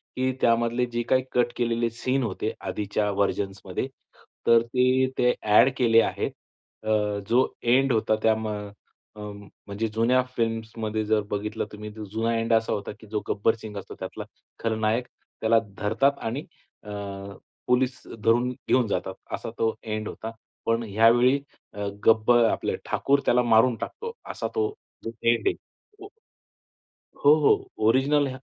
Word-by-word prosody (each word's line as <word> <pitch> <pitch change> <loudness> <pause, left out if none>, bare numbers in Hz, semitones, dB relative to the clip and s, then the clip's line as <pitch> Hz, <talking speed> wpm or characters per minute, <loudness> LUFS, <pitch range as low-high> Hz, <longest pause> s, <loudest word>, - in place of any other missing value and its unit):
की 130 0 +1
त्यामधले 120 +1 +2
जे 120 - 0
काही 130 0 +4
कट 120 -1 +2
केलेले 115 -1 0
सीन 130 +4 -1
होते 110 0 -2
आधीच्या 105 0 -1
व्हर्जन्समध्ये, 100 +1 -2 0.6
तर 115 0 +7
ते 130 +2 +2
ते 125 0 +4
अ‍ॅड 105 +5 +6
केले 115 -3 +5
आहेत. - - -1 0.5
अ, 105 -1 +1
जो 125 +3 +4 0.2
एंड 130 +3 +3
होता 110 -1 +2
त्या 110 - +5
अ, 105 -2 -4 0.5
अं 105 -1 -7 0.3
म्हणजे 100 +3 -2
जुन्या 115 +4 +2
फिल्म्समध्ये 115 -1 -2
जर 110 0 +2
बघितलं 105 +2 -2
तुम्ही 105 0 -8
तर 110 - -7
जुना 115 +1 0
एंड 115 0 0
असा 115 0 +2
होता, 100 - -4
की 110 - -14
जो 105 0 -2
गब्बर 110 +2 +2
सिंग 105 -2 -7
असतो 100 - -8
त्यातला - - -6 0.4
खलनायक, 110 +2 0 0.3
त्याला 115 +1 +4 0.2
धरतात 135 +7 +1
आणि 135 +6 -4 0.4
अ, 105 - -11 0.8
पोलीस 130 +1 +1 0.2
धरून 120 +2 +3
घेऊन 125 -1 +1
जातात, - - -2 0.2
असा - - -4
तो 110 0 +2
एंड 110 -1 -3
होता. 110 - -6 0.3
पण 115 +1 +1
यावेळी 120 +6 +5 0.3
अ, 105 0 -4 0.2
गब्बर 115 +2 +5
आपले - - -1
ठाकूर 140 +1 +2
त्याला 125 0 +4
मारून 115 +1 +4
टाकतो. 460 - -6
असा - - -4
तो 430 -1 +2 0.6
एंड 115 -1 +2
आहे - - +3
तो. 415 -2 -17 1.2
हो, 145 +1 +8
हो. 145 - +5 0.3
ओरिजिनल 140 +4 +3
115 Hz, 150 wpm, -26 LUFS, 110-125 Hz, 1.2 s, हो